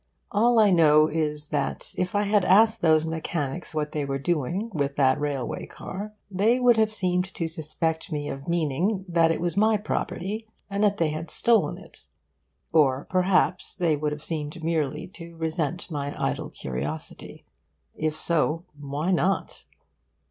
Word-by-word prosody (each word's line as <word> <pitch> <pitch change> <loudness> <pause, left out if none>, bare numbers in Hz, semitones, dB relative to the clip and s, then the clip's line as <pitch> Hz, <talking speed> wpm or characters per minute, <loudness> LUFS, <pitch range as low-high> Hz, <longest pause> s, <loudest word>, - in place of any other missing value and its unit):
All 235 +3 +3
I 210 -3 +6
know 155 -3 +6
is 150 -1 -1
that 145 -2 -2
if 180 +2 -2
I 205 - +3
had 205 -1 +2
asked 220 +5 +5
those 160 -1 +4
mechanics 160 0 -3
what 150 -1 -1
they 150 - -2
were 135 0 -2
doing 175 - -1
with 140 -3 -1
that 130 -2 +3
railway 145 -4 -3
car 210 +3 -7 0.2
they 215 +6 +3
would 245 -1 +5
have 220 -1 +3
seemed 180 -3 +2
to 165 - -1
suspect 160 +2 -3
me 145 -1 -2
of 135 +3 -6
meaning 175 +5 0
that 165 -2 +3
it 165 - 0
was 175 0 -1
my 215 +2 +4
property 210 +1 -3 0.2
and 200 +1 0
that 205 -1 +3
they 165 -2 +2
had 155 +2 -5
stolen 230 +5 +2
it. - - -16 0.7
Or 140 -4 +3
perhaps 185 0 +2
they 165 -4 +2
would 150 0 -2
have 150 0 -6
seemed 155 0 -4
merely 155 -1 -1
to 170 -3 -11
resent 160 +1 -2
my 145 -1 -4
idle - - -2
curiosity. 70 +5 -6 0.5
If 155 -1 -2
so, 165 0 0
why 145 +5 -2
not? 190 +2 0
165 Hz, 165 wpm, -26 LUFS, 150-190 Hz, 0.7 s, I